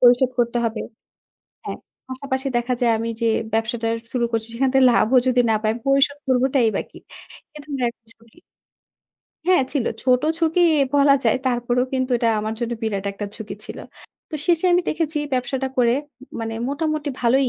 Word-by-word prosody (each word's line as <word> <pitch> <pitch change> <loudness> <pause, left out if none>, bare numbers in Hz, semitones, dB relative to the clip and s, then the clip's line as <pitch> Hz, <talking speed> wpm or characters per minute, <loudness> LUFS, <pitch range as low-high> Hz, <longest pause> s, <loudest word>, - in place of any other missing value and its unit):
পরিশোধ 245 +1 +5
করতে 240 0 +1
হবে। 225 -1 -3 0.8
হ্যাঁ, - - -5 0.3
পাশাপাশি 265 +1 -3
দেখা 240 +1 0
যায় 240 -2 +3
আমি 230 +1 -3
যে 230 - +1 0.3
ব্যবসাটা 225 +1 -1 0.2
শুরু 245 -2 0
করছি, 225 -1 -1
সেখান 265 +3 +1
থেকে 265 -1 +5
লাভও 240 +1 +3
যদি 250 -1 +3
না - - +4
পাই, 215 0 +1
আমি 235 - -7
পরিশোধ 275 +1 +3
করবটাই 255 -1 +3
বা - - 0
কি? - - -13 0.6
এ - - -6
ধরনের 275 -4 -2
একটা 235 -1 -27
ঝুকি। 230 +5 -23 1.1
হ্যাঁ, 365 -5 +4
ছিল। 275 -6 0 0.2
ছোট 250 0 +3 0.2
ঝুঁকি 330 +1 +2 0.3
বলা 280 -1 +6
যায়। 225 - +3
তারপরেও 245 0 +1
কিন্তু 260 0 -1
এটা 235 - +2
আমার 215 +1 -3
জন্য 235 0 -2
বিরাট 205 -3 -2
একটা 205 +1 -5
ঝুঁকি 220 -2 -7
ছিল। - - -8 0.5
তো - - -6
শেষে 345 0 +3
আমি 355 +1 +4
দেখেছি 315 -1 -1 0.2
ব্যবসাটা 265 +1 -1
করে 240 -2 +4 0.5
মানে 225 0 -4
মোটামুটি 305 0 -2
ভালোই 255 +2 +3
250 Hz, 175 wpm, -22 LUFS, 230-275 Hz, 1.1 s, বলা